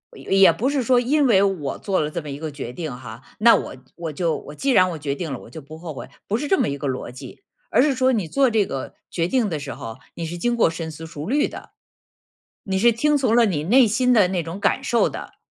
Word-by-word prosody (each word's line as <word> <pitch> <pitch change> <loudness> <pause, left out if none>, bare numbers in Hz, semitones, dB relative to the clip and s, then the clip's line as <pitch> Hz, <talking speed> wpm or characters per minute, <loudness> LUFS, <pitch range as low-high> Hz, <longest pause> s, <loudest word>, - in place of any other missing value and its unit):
也 - - -12 0.2
也 195 - +7
不 255 +5 -1
是 285 -1 0
说 250 0 +3
因 280 +3 +2
为 200 -5 +5
我 180 -9 -1
做 195 -2 -1
了 150 -1 0
这 170 +2 -4
么 150 - -9
一 140 0 -6
个 160 -1 -5
决 135 -4 -6
定 155 -2 -5
哈， 120 -1 -10 0.2
那 230 +2 +7
我 - - -4 0.2
我 165 -3 -5
就 165 +1 0
我 150 - -10
既 275 - -2
然 185 -6 +5
我 165 - -5
决 145 -2 -3
定 165 -1 -5
了， - - -5
我 - - -13
就 160 - -9
不 155 +3 -11
后 165 -1 -7
悔。 135 - -9 0.2
不 215 - 0
是 295 - -3
这 385 - +3
么 - - +1
一 140 - -3
个 140 0 -4
逻 130 -2 -4
辑。 130 0 -11 0.3
而 240 - +5
是 285 +1 +3
说 260 0 +2
你 210 -6 0
做 270 - +3
这 220 -3 +2
个 135 -6 -6 0.2
决 170 -1 0
定 230 0 +1
的 155 -3 -3
时 140 -2 -6
候， 115 +1 -8 0.2
你 170 - -5
是 170 +2 -5
经 240 +6 0
过 230 - +3
深 165 0 -5
思 160 +1 -9
熟 160 -1 -7
虑 290 +5 +2
的， - - -11 0.9
你 190 -1 -2
是 235 +5 +5
听 295 +6 +2
从 255 -5 +1
了 235 -1 +5
你 155 -8 -1
内 240 +5 +5
心 250 +4 +2
的 210 -6 +5
那 180 -2 -1
种 165 +5 -7
感 270 - +1
受 240 -4 +2
的。 - - -9
180 Hz, 295 characters per minute, -22 LUFS, 150-240 Hz, 0.9 s, 也